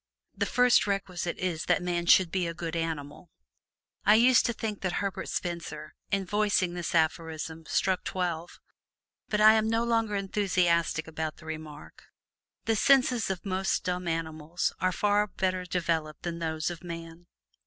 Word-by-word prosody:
"The - - -1
first 250 -3 +4
requisite 185 -3 -2
is 175 -4 -2
that 185 - +2
man 175 -1 -1
should 180 -2 +6
be 185 -2 0
a 165 - -5
good 165 -1 -4
animal." 160 -1 -4 0.7
I 210 - +6
used 245 +3 +5
to - - +1
think 215 -2 -4
that 185 -2 -1
Herbert 200 -2 -3
Spencer 165 -3 -4 0.2
in 195 -1 0
voicing 205 -2 +1
this 175 -1 -3
aphorism 160 0 -1
struck 190 -1 +1
twelve. 175 -2 -3 0.7
But 210 0 +1
I 215 +1 +9
am 220 0 +2
no 225 +1 +1
longer 225 -3 +1
enthusiastic 180 -5 +1
about 160 -1 -4
the 160 - -15
remark. 155 -2 -9 0.6
The 225 - +2
senses 250 -2 +3
of 190 0 -4
most 190 0 0
dumb 180 0 -2
animals 160 0 -2
are 185 - +1
far 205 +3 +2
better 185 -1 -2
developed 165 -4 -2
than 170 -1 -4
those 160 0 -2
of 170 -1 -9
man. 165 0 -8
175 Hz, 160 wpm, -28 LUFS, 165-200 Hz, 0.7 s, I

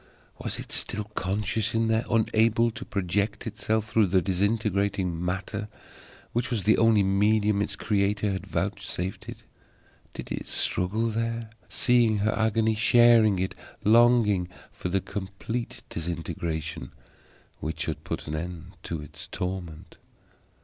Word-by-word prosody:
Was - - -3
it - - -8
still 105 - -1
conscious 105 +1 -2
in 115 0 +2
there, 110 +1 +1
unable 115 +1 +3
to - - -7
project 100 +2 -1
itself 110 0 -1
through 110 -2 +3
the 95 +1 +3
disintegrating 100 -2 0
matter 95 +3 -3 0.7
which 120 +1 0
was 115 -6 -1
the 110 +1 +4
only 115 -3 +5
medium 105 +1 +2
its 100 -1 -1
Creator 100 0 +1
had 95 - -4
vouchsafed 95 -2 -3
it? - - -9 0.7
Did - - -7
it - - -4
struggle 105 +6 0
there, 115 0 -2 0.2
seeing 120 -3 +3
her 105 +1 +1
agony, 110 0 +2
sharing 115 -2 +5
it, 95 +1 -1 0.3
longing 110 -4 +5 0.2
for 90 - -5
the 95 +1 +1
complete 105 +6 -5
disintegration 80 -4 -4 0.7
which 80 +1 -4
should - - -3
put - - -4
an 75 - -5
end 85 +1 -6
to 80 -3 -5
its 75 - -10
torment? 90 -4 -5
105 Hz, 135 wpm, -27 LUFS, 95-110 Hz, 0.7 s, only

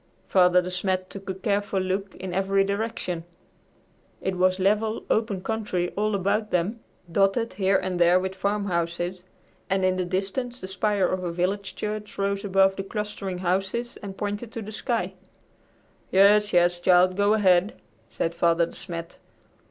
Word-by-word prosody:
Father 180 -1 +5
De 180 - -4
Smet 185 0 -1
took 195 -1 -8
a - - 0
careful 200 0 -1
look 190 +1 -2
in 185 -1 -6
every 195 +1 +2
direction. 200 -4 -3 1.0
It 190 - -2
was 185 0 +3
level, 210 +3 +1
open 215 -4 +1
country 205 -6 -2
all 210 +1 0
about 200 +3 0
them, 185 +7 0 0.3
dotted 200 +5 +2
here 190 0 +2
and 185 -1 -3
there 175 +1 +5
with 190 0 -3
farmhouses, 180 -2 -2 0.4
and 190 -1 +2
in 185 0 +2
the 185 - 0
distance 200 +7 -2
the 185 - -7
spire 195 +1 +1
of 185 0 -1
a 175 - -2
village 190 +3 -2
church 210 0 -5
rose 200 0 -1
above 195 -1 +3
the 195 - -2
clustering 205 -2 -4
houses 195 +7 -1
and 195 -2 -7
pointed 205 +3 -4
to 230 - -5
the 210 - -8
sky. 230 +2 -2 1.0
"Yes, 205 +2 +5
yes, 175 0 +3
child. 180 +1 +4
Go 205 +2 +3
ahead," 190 -1 +3 0.3
said 165 - -2
Father 170 0 +3
De - - -12
Smet. 170 -3 -7
195 Hz, 160 wpm, -25 LUFS, 180-205 Hz, 1.0 s, Father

